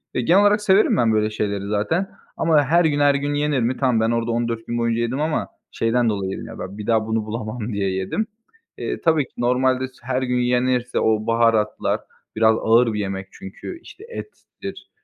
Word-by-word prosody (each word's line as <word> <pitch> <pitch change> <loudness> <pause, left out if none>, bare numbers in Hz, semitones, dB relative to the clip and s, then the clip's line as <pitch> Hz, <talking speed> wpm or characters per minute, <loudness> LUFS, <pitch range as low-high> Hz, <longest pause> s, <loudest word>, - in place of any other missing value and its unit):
ve - - +1
genel 175 +11 +4
olarak 205 +1 +4
severim 205 0 +4
ben 115 -2 +3
böyle 105 0 +2
şeyleri 100 -2 -3
zaten. 135 - 0 0.3
Ama 155 -3 +3
her 165 +5 +3
gün 145 -2 +1
her 145 -1 +4
gün 145 +1 -1
yenir 145 -1 +1
mi? 120 +2 0
Tamam 125 -4 +2
ben 110 +1 +2
orada 115 0 0
14 115 -1 -2
gün 120 - -2
boyunca 115 0 0
yedim 125 +4 -1
ama 155 0 -1 0.2
şeyden 115 +1 +1
dolayı 100 -3 -2
yedim, - - -6
ya, - - -10
ben 95 +2 -7
bir 105 - -7
daha 110 -1 +2
bunu 110 -1 -1
bulamam 110 +1 -4
diye 100 -1 0
yedim. 95 - -2 0.5
Eee, - - -4
tabii 160 -3 +3
ki - - -28
normalde 130 +2 +1
s 130 - -21
her 130 +1 -1
gün 125 -1 0
yenirse 125 0 +1
o 110 -1 +1
baharatlar 115 -2 +2 0.4
biraz 110 0 +4
ağır 115 +1 +4
bir 105 - -2
yemek 95 -1 -4
çünkü, 100 - -9
işte, 390 - -14
ettir, 450 -2 -9
120 Hz, 205 wpm, -22 LUFS, 110-140 Hz, 0.5 s, genel